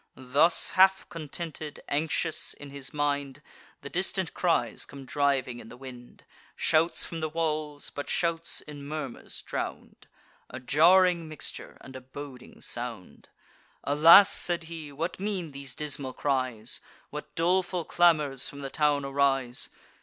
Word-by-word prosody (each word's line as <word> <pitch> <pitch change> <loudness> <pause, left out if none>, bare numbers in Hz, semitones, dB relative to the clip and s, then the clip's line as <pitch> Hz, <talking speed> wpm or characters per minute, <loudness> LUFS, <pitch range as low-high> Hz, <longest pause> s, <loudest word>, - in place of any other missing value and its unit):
Thus 140 +6 +4
half 190 +1 +4
contented, 155 -1 -6
anxious 160 +2 0
in 145 -1 -11
his 140 -1 -5
mind, 145 -2 -1 0.4
The - - -6
distant - - 0
cries - - +1
come 140 -1 -9
driving 135 -3 0
in 110 - -11
the 125 - -11
wind, 125 -2 -12 0.3
Shouts 165 +1 +2
from 165 - -6
the 155 0 -2
walls, 155 -2 -2
but 145 - -6
shouts 170 -2 0
in 145 -2 -10
murmurs 150 -5 -6
drown'd; - - -6 0.4
A - - -7
jarring 170 +5 +4
mixture, 155 - -6
and 130 - -12
a 130 - -7
boding 130 0 -11
sound. 120 -6 -6 0.5
"Alas!" 165 +7 +8
said 175 -1 +1
he, 160 -3 -8
"what 165 +7 -4
mean 190 -5 -3
these 140 -2 -7
dismal 140 -3 -3
cries? 130 -6 -1 0.3
What 150 0 -8
doleful 175 0 +1
clamours 150 -6 +3
from 140 - -10
the 135 -1 -5
town 145 -2 +1
arise?" 135 -3 +1
145 Hz, 140 wpm, -28 LUFS, 135-165 Hz, 0.5 s, Alas